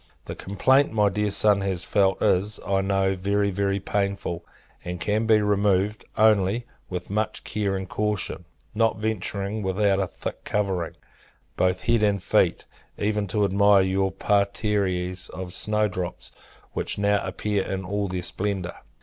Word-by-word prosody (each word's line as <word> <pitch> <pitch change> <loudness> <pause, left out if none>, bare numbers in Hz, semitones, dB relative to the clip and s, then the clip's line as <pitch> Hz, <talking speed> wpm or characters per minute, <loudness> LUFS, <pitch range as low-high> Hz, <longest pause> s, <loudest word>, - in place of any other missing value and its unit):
The - - -5
complaint 130 +8 +2
my 105 -2 +3
dear 105 +1 0
son 105 0 +3
has 95 -3 -1
felt 95 -2 +2
is, 100 +4 +2
I 95 -1 +1
know, 95 0 +1
very, 100 +2 0
very 100 +1 0
painful: 100 -3 -2 0.4
and 90 0 -5
can 105 +6 0
be 110 -2 +5
removed, 105 0 +1
only, 110 +1 +3 0.2
with 90 0 -5
much 105 0 -1
care 100 -2 -1
and 95 0 -4
caution; 105 -1 -2 0.3
not 115 0 +2
venturing, 105 -1 -2
without 95 0 +1
a 95 - 0
thick - - -7
covering, 95 -5 -1 0.6
both 90 0 +1
head 115 -2 +2
and 100 -3 +2
feet, - - +2 0.3
even 105 0 0
to 105 +2 +1
admire 100 0 +5
your 95 0 +1
parterres 95 -3 0
of 90 -1 -6
snow 105 0 +1
drops, 90 -3 -5 0.4
which - - -3
now 100 0 +2
appear 100 +1 -1
in 95 0 -4
all 100 +1 -1
their 90 -1 -3
splendour. 95 -1 -3
100 Hz, 150 wpm, -25 LUFS, 95-105 Hz, 0.6 s, be